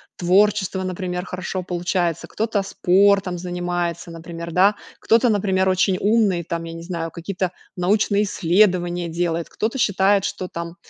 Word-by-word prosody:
творчество, 190 +1 +2
например, 180 -1 -4
хорошо 185 0 -4
получается, 175 -1 -1
кто-то 215 -2 -1
спортом 195 -1 +2
занимается, 175 -1 -3
например, 165 0 -8
да, 195 +5 +4 0.2
кто-то, 230 +2 +3
например, 190 -3 +1
очень 185 0 +2
умный, 205 -5 +2
там 170 0 -4
я 165 - -7
не 165 - -8
знаю 170 -2 -4
какие-то 180 +1 -3 0.2
научные 200 +3 +2
исследования 175 -2 +1
делает, 170 0 -2
кто-то 225 +5 -3
считает, 195 -2 +3
что 185 - -4
там 170 -1 -6
180 Hz, 140 wpm, -21 LUFS, 175-200 Hz, 0.2 s, да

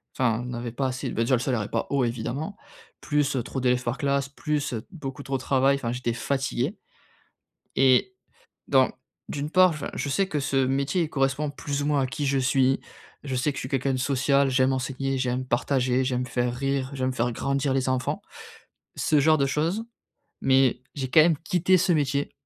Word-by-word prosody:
enfin 120 -2 +1
on - - -6
n'avait 120 -1 -5
pas 135 +3 -2
assez 130 +1 -2
de - - -6
ben, 115 - +1
déjà 130 - +1
le 120 - +4
salaire 125 -3 -1
est 105 - -8
pas - - -1
haut, 140 -2 +1
évidemment, 125 - -3 0.5
plus 145 -1 0
trop 135 - -4
d'élèves 125 0 +1
par 120 +2 -2
classe, 140 -2 0
plus 145 -2 -2 0.2
beaucoup 140 -6 -7
trop 135 0 -2
de - - -9
travail. 135 +1 +3
Enfin, 120 -4 -3
j'étais 125 -1 -2
fatigué 135 - -2 1.0
et 135 - +4 0.5
donc, - - +4 0.3
d'une 145 +1 -4
part 185 +1 +6
enfin 155 -3 -5
je 145 - -3
sais 190 +8 +1
que 150 - -1
ce 135 -1 +1
métier 140 +5 0
correspond 140 +1 0
plus 145 0 -3
ou - - -2
moins 145 -2 +2
à - - +1
qui 140 +2 -3
je 135 0 +2
suis. 130 0 +2 0.4
Je 135 - -3
sais 130 +4 +1
que - - -13
je - - -3
suis 130 - -5
quelqu'un 135 0 0
de - - -1
social, 140 +1 +2
j'aime 130 0 +3
enseigner, 135 +1 -2
j'aime 130 0 -1
partager, 130 +1 +1
j'aime 125 -1 -1
faire 120 0 -1
rire, 135 0 -1
j'aime 130 -1 -1
faire 120 -1 -1
grandir 140 +2 -1
les 130 -1 0
enfants. 130 -1 -1 0.7
Ce 150 - +2
genre 155 +2 +4
de 140 - +2
choses. 165 +10 0 0.6
Mais 130 -2 +3
j'ai 130 -2 -3
quand 155 - +7
même 160 -1 +4
quitté 180 +3 +2
ce 175 +1 +2
métier 140 -2 0
135 Hz, 205 wpm, -26 LUFS, 130-145 Hz, 1.0 s, quand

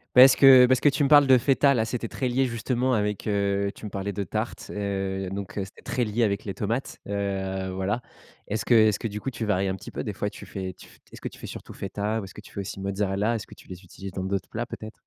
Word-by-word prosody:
Parce 130 +1 +9
que 130 -2 +9
parce 130 0 +3
que 145 - +4
tu 140 +1 +1
me 140 - +3
parles 145 -2 +7
de 130 -1 +7
feta 140 +2 +3
là, 110 -2 +2
c'était 115 0 -3
très 130 +3 -2
lié 130 +2 +2
justement 125 +2 0
avec, 105 -1 -1
heu, 100 -1 0
tu - - -13
me 105 - -5
parlais 100 +1 -3
de 100 - -3
tarte, 90 - -4
heu, 95 -2 -2
donc 100 +1 -5
heu, 95 - -1
c'était 95 - -15
très 125 - -1
lié 110 +2 -1
avec 100 -2 +1
les 100 -3 -4
tomates, 115 +6 -3
heu, 95 -2 -2
voilà. 95 +5 -1 0.5
Est-ce 105 +1 -2
que 120 - +3
est-ce 110 -2 +5
que 115 - -2
du 105 +1 -6
coup 135 - -4
tu 115 -1 -4
varies 100 -2 +1
un 95 - -1
petit 95 - -9
peu, - - -5
des - - -3
fois - - -3
tu - - -11
fais, 95 -1 -5
tu - - -15
fais - - -20
est-ce - - -12
que - - -7
tu - - -15
fais - - -7
surtout - - -9
feta 105 +3 -2
ou - - -7
est-ce 95 - -11
que - - -9
tu - - -16
fais 100 - -4
aussi 95 0 -6
mozzarella? 100 +3 0
Est-ce 110 - -4
que - - -13
tu - - -17
les 90 0 -10
utilises 95 +1 -9
dans 95 - -4
d'autres 95 0 -2
plats, 120 +1 -4
peut-être? 110 -1 -8
105 Hz, 285 wpm, -26 LUFS, 95-120 Hz, 0.5 s, Parce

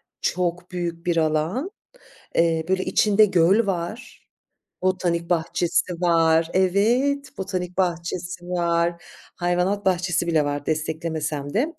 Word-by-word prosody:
birçok 180 0 -3
büyük 175 -1 -4
bir 175 - +1
alan. 160 - 0 0.7
Eee, 165 -1 +2
böyle 190 0 +1
içinde 215 0 +4
göl 195 +3 +3
var, 195 +5 -5 0.5
botanik 175 -2 0
bahçesi 175 +1 0
var 165 -1 +3
Evet, 240 +10 +1
botanik 185 -2 -4
bahçesi 175 0 -2
var, 170 -1 0 0.3
hayvanat 180 +3 0
bahçesi 175 -2 +1
bile 160 -3 +2
var, 145 0 -3
desteklemesem 155 -2 -3
de. 285 +10 0
175 Hz, 110 wpm, -23 LUFS, 165-190 Hz, 0.7 s, içinde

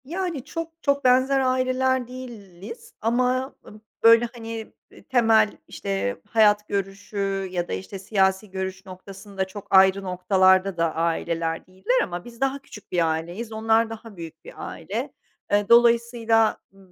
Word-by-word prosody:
Yani 335 -3 -4
çok 330 +1 -5
çok 280 -1 +1
benzer 260 +2 +4
aileler 255 -1 +1
değiliz 230 -5 -10
ama, 250 +3 0
ııı, 210 0 -14 0.2
böyle, 230 +1 +7
hani, 225 -2 -7 0.2
iii, - - -17
temel, 225 -4 +3
işte, 200 +5 -3
hayat 210 -2 +4
görüşü 195 0 -3
ya 175 -1 -2
da, - - -4
işte, 95 - -6
siyasi 190 0 +1
görüş 190 0 -5
noktasında 195 +1 -7
çok 205 +1 -10
ayrı 190 +1 +5
noktalarda 185 0 +2
da 165 -1 0
aileler 165 0 -1
değiller 190 +8 0
ama 175 -1 -6
biz 235 0 -13
daha 270 +1 0
küçük 210 -6 -14
bir 170 -3 +2
aileyiz. 175 +8 -5
Onlar 225 +1 +2
daha 225 -2 -10
büyük 165 -2 -10
bir - - -10
aile. - - -5 0.4
Eee, 205 +1 +2
dolayısıyla 235 -1 +4
b 195 - -25
215 Hz, 145 wpm, -24 LUFS, 190-240 Hz, 0.4 s, böyle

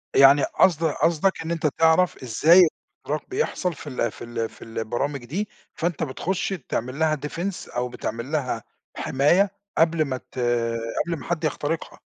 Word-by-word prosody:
يعني 135 +1 +7
قصد 170 -3 +3
قصدك 165 +4 +1
إن 165 +1 -4
أنت 160 -2 +1
تعرف 160 +1 +3
إزاي 165 +9 +6 0.4
الاختراق 150 +2 -3
بيحصل 380 - -1
في 150 - -11
ال 120 -4 -1
في - - -10
ال 115 -1 -3
في - - -19
البرامج 120 +4 -3
دي 195 - -3 0.2
فأنت 170 -1 -2
بتخش 175 +7 -2 0.2
تعمل 130 +5 -3
لها 155 -1 +3
defense 175 +5 -5
أو 125 0 -1
بتعمل 120 +2 -5
لها 125 -7 -1 0.3
حماية 175 +9 +3 0.3
قبل 165 -1 +3
ما 130 -2 -2
ت 130 - -11 0.7
قبل 170 -1 -2
ما - - -9
حد 170 -1 -2
يخترقها. 155 +1 -2
155 Hz, 160 wpm, -24 LUFS, 130-170 Hz, 0.7 s, يعني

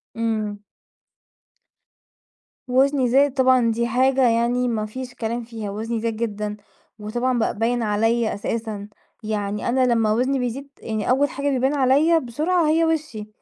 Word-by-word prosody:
إمم. 215 -2 -2 2.1
وزني 265 +1 +2
زاد 275 +1 +4
طبعًا، 255 -3 +3
دي 235 +1 -1
حاجة 260 0 +3
يعني 240 +2 +1
ما 215 -2 -1
فيش 250 +3 -7
كلام 235 +1 -3
فيها، 225 -3 -6
وزني 225 +2 -3
زاد 230 -1 -2
جدًا، 210 -2 -3 0.4
وطبعًا 240 +4 -1
بقى 225 - -1
باين 235 +1 0
عليّا 225 +2 +1
أساسًا، 210 0 -4 0.4
يعني 210 0 -2
أنا 255 +1 +2
لمّا 220 -2 +2
وزني 255 +4 +1
بيزيد 250 +3 -4
يعني 220 0 -3
أول 275 +2 +3
حاجة 280 +1 -2
بيبان 265 +1 +1
عليّا 290 +5 +3
بسرعة 310 +6 0
هي 325 +2 +3
وشي، 300 -10 -2
240 Hz, 145 wpm, -22 LUFS, 220-265 Hz, 2.1 s, زاد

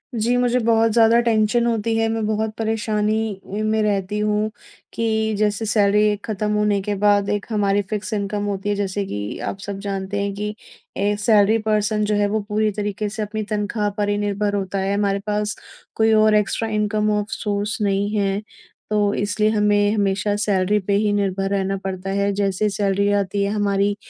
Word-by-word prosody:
जी, 230 +2 +1
मुझे 245 0 +2
बहुत 225 -1 +3
ज़्यादा 230 +1 +5
टेंशन 230 0 +2
होती 230 -1 0
है, 225 0 +2
मैं 225 -1 -1
बहुत 215 0 -1
परेशानी 220 -1 -1
उ, 195 - -7
में 215 0 +1
रहती 205 0 -1
हूँ 210 0 0 0.4
कि 220 -1 0
जैसे 210 +1 0
सैलरी 210 -1 +3
एक 205 -1 -5
खत्म 210 -1 -2
होने 210 -1 +2
के 205 +1 -2
बाद 205 0 +2
एक 205 0 -1
हमारी 205 -2 +1
फिक्स 215 +1 -3
इनकम 205 0 -2
होती 200 0 -3
है 205 - +1
जैसे 200 0 -2
कि 105 - -5
आप - - -3
सब 195 0 -6
जानते 200 0 -3
हैं 200 0 -2
कि 210 +1 -4 0.4
ए 205 +1 +1
सैलरी 210 0 +4
पर्सन 215 0 +1
जो 210 0 0
है 205 0 +2
वो 215 +2 0
पूरी 215 0 +1
तरीके 210 0 -3
से 215 +2 -5
अपनी 215 +1 -3
तनख़्वाह 210 0 -1
पर 205 -1 0
ही 205 - +1
निर्भर 205 0 -1
होता 195 -1 -2
है, 195 +1 0
हमारे 200 -1 +1
पास 210 0 -1 0.4
कोई 220 0 +3
और 215 0 +5
एक्स्ट्रा 210 +2 0
इनकम 210 0 0
ऑफ 205 - -2
सोर्स 210 -1 -2
नहीं 200 0 +1
है। 200 0 0 0.5
तो 205 -1 +2
इसलिए 205 +1 0
हमें, 210 -1 +2
हमेशा 205 0 0
सैलरी 205 -1 +1
पे 200 0 -2
ही 210 +1 +2
निर्भर 195 -1 0
रहना 195 0 -1
पड़ता 190 0 -4
है, 200 +1 +1
जैसे 195 0 0
ही - - +2
सैलरी 200 0 +1
आती 200 0 0
है 200 - 0
हमारी 205 -1 +1
205 Hz, 195 wpm, -21 LUFS, 200-215 Hz, 0.5 s, ज़्यादा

